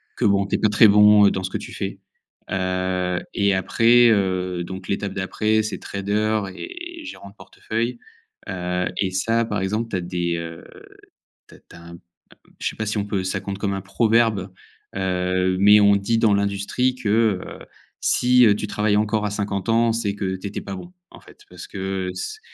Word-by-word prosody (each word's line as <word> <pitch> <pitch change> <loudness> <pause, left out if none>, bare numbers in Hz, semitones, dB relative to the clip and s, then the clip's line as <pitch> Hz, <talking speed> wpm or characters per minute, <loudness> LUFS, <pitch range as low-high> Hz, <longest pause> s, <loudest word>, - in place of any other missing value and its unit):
que - - -4
bon, 100 -1 +3
heu, - - -8
tu - - +1
es - - +2
pas 105 - +2
très 105 +1 +6
bon 105 0 +7
dans 95 - -3
ce 95 - -3
que - - -3
tu - - -10
fais, - - -5 0.5
heu 90 -1 -1
et 100 0 +2
après 115 +6 +4
heu, 95 -4 0
donc 95 +1 -8
l'étape 100 0 -2
d'après, 110 +3 0
c'est 110 - -4
trader 105 +2 -1
et 350 -2 -8
gérant 100 - -9
de 100 - -20
portefeuille, 115 +3 -4 0.5
heu 90 -1 -2
et 95 -2 0
ça, 115 +5 +1
par 105 -2 -3
exemple, 110 +4 -2
tu 105 - -4
as - - -3
des 85 -1 -2
heu, 80 0 -7 0.9
tu - - -16
as - - -16
tu - - -17
as 85 - -13
un 85 - -12
m 85 - -11 0.6
je - - -2
sais - - -10
pas 110 - -3
si 105 +1 -2
on 100 - -1
peut 100 -2 -2
ça 95 - -2
compte 100 -1 -5
comme 100 -1 -2
un 95 - -3
proverbe, 110 -1 +1 0.4
heu, 90 0 0
mais 105 +2 +7
on 100 0 +5
dit 100 +3 0
dans 110 -2 +3
l'industrie 100 +6 0
que: 130 - -17 0.4
«Heu, - - -10 0.4
si 125 0 +4
heu, 105 - +6
tu 105 - -4
travailles 105 0 +1
encore 105 0 0
à 105 - 0
50 100 0 -3
ans 115 0 +3
c'est 110 -3 -1
que 95 -2 -3
tu 95 - -6
étais - - -5
pas 100 - -7
bon», 175 - -10 0.2
en - - -14
fait, - - -18
parce - - -10
que 95 -1 -4
c 260 - -6
100 Hz, 210 wpm, -22 LUFS, 95-110 Hz, 0.9 s, bon